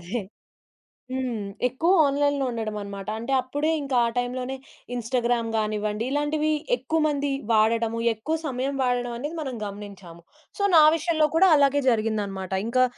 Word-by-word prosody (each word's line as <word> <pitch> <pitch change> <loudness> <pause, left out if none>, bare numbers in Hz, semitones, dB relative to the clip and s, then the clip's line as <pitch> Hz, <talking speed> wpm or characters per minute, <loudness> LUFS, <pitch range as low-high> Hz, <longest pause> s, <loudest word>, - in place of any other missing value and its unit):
అదే. 205 +7 -3 0.9
హ్మ్. 250 -5 -2 0.2
ఎక్కువ 325 +9 +1
ఆన్‌లైన్‌లో 285 0 +1
ఉండడమన్నమాట. 210 -3 -5
అంటే 235 +4 -5
అప్పుడే 290 +5 -1
ఇంకా 275 -2 -2
ఆ - - +1
టైంలోనే, 250 +1 -2 0.4
ఇన్‌స్టాగ్రామ్ 240 -1 0
గానివ్వండి, 215 0 -1
ఇలాంటివి 300 +2 0 0.2
ఎక్కువ 265 +6 -2
మంది 285 -1 -1 0.2
వాడడము. 225 +1 +2
ఎక్కువ 265 +9 -3
సమయం 270 0 -2
వాడడమనేది 245 +5 -2
మనం 265 -4 -4
గమనించాము. 200 -4 -9 0.4
సో, 405 - -1
నా 320 - +9
విషయంలో 325 -1 +1
కూడా 380 +3 +6
అలాగే 285 0 +3
జరిగిందన్నమాట. 210 -5 -1 0.2
ఇంకా 255 +2 +3
245 Hz, 130 wpm, -25 LUFS, 220-285 Hz, 0.9 s, నా